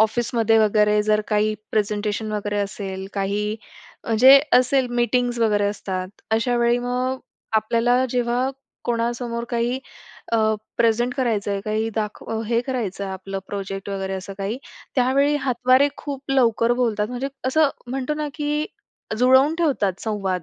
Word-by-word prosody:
ऑफिसमध्ये 225 0 +2
वगैरे 210 -1 +3
जर 215 0 +2
काही 215 0 +2 0.2
प्रेझेंटेशन 210 0 -1
वगैरे 205 0 -2
असेल, 195 -1 -4
काही 205 +2 -1 0.5
म्हणजे 260 +5 +7 0.2
असेल 255 +1 +2
मीटिंग्ज 240 0 +1
वगैरे 210 -2 +2
असतात. 185 -2 -4 0.2
अशा 240 +2 +1
वेळी 240 0 +3
मग 250 +1 -1 0.4
आपल्याला 235 +3 +2
जेव्हा 245 +1 0 0.3
कोणासमोर 235 0 -2
काही 240 +2 0 0.5
अ, 230 - +4 0.4
प्रेझेंट 235 +3 +2
करायचं 225 -7 0
आहे, 200 -1 -1
काही 215 +2 -1
दाखव 220 +1 -3
हे 230 0 +2
करायचं 210 -7 -3
आहे 190 - -4
आपलं 195 +1 -5
प्रोजेक्ट 195 -1 -5
वगैरे 195 -1 -3
असं 190 +1 -6
काही. 200 +5 -3 0.4
त्यावेळी 275 +3 +3
हातवारे 255 +1 +3
खूप 280 -2 -6
लवकर 235 -3 +3
बोलतात, 215 -3 +1
म्हणजे 250 +2 -3 0.2
असं 305 +2 +4 0.2
म्हणतो 265 +3 -2
ना, 300 -1 -3
की 300 0 -1 0.5
जुळवून 260 +5 +5
ठेवतात 210 - 0
संवाद. 195 -5 -2
230 Hz, 140 wpm, -22 LUFS, 210-250 Hz, 0.5 s, म्हणजे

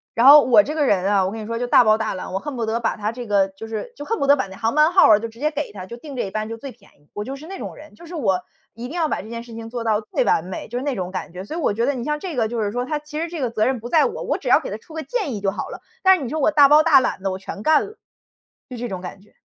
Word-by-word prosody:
然 235 - +3
后 295 +1 +11
我 255 +4 +6
这 300 - -4
个 300 -2 +2
人 190 -6 +2
啊， 200 -1 +3
我 190 - -2
跟 225 - -6
你 215 - -7
说 230 +1 -3
就 245 - -2
大 245 - +6
包 215 -1 +4
大 220 0 -2
揽， 185 - -7
我 195 - -1
恨 290 +2 -6
不 230 -2 -2
得 225 +1 -1
把 230 - -1
它 210 +1 -2
这 240 -1 -8
个， 195 -2 +2
就 205 +4 -10
是， 225 - -5
就 290 - -7
恨 455 +1 -1
不 - - 0
得 285 - +7
把 260 - -2
那 190 - -11
航 230 +1 -1
班 305 +2 +4
号 375 - +7
儿 210 - +7
啊， - - -5
就 230 - -4
直 225 +1 -16
接 305 +2 0
给 300 0 -4
他， 185 -2 -8
就 235 +5 -9
定 280 +2 -10
这 245 - -1
一 195 - -5
班 215 0 -3
就 230 - -5
最 265 +3 -8
便 215 -4 -21
宜， 145 - -31
我 210 - -5
就 270 - -5
是 295 +3 -11
那 385 +1 -7
种 - - -6
人， 310 +1 -14
就 340 - -14
是 340 +1 -9
我 195 - +1 0.3
一 235 +2 -7
定 315 - -8
要 320 -3 0
把 - - -2
这 215 - -12
件 230 0 -6
事 235 -1 -12
情 225 0 -8
做 235 0 -4
到 215 -2 +1
最 215 +3 -1
完 175 -5 +1
美， 185 - -7
就 240 - -4
是 260 - -4
那 285 -3 -1
种 185 -1 -4
感 185 -2 -6
觉。 185 +1 -7
所 310 - -7
以 - - -2
我 245 - +1
觉 230 +3 0
得 285 - +1
你 240 - -5
像 300 0 -1
这 325 -4 -6
个 225 - +2
就 230 0 -3
是 205 -1 -1
说， 245 +2 -2
它 300 +3 -2
其 300 +1 -7
实 335 - -2
这 335 -3 -6
个 250 - 0
责 215 -1 0
任 260 -1 +1
不 240 - -7
在 320 -2 +4
我， 470 +1 -3
我 - - -1
只 - - -9
要 - - +5
给 - - -6
他 - - -4
出 325 - -17
个 320 - -4
建 415 - -2
议 205 - -6
就 195 -1 +1
好 - - -5
了， - - -9 0.2
但 380 0 +6
是 290 - -6
你 240 - -4
说 310 +3 -3
我 290 - +3
大 290 -2 +6
包 300 +1 +7
大 310 -5 +6
揽 190 - -2
地 195 - -1
我 185 - -4
全 195 +1 -8
干 310 +4 +3
了。 425 +2 -13 0.7
就 250 - -7
这 240 0 -4
种 185 -2 -4
感 190 +1 -8
觉。 210 - -25
240 Hz, 405 characters per minute, -22 LUFS, 215-300 Hz, 0.7 s, 后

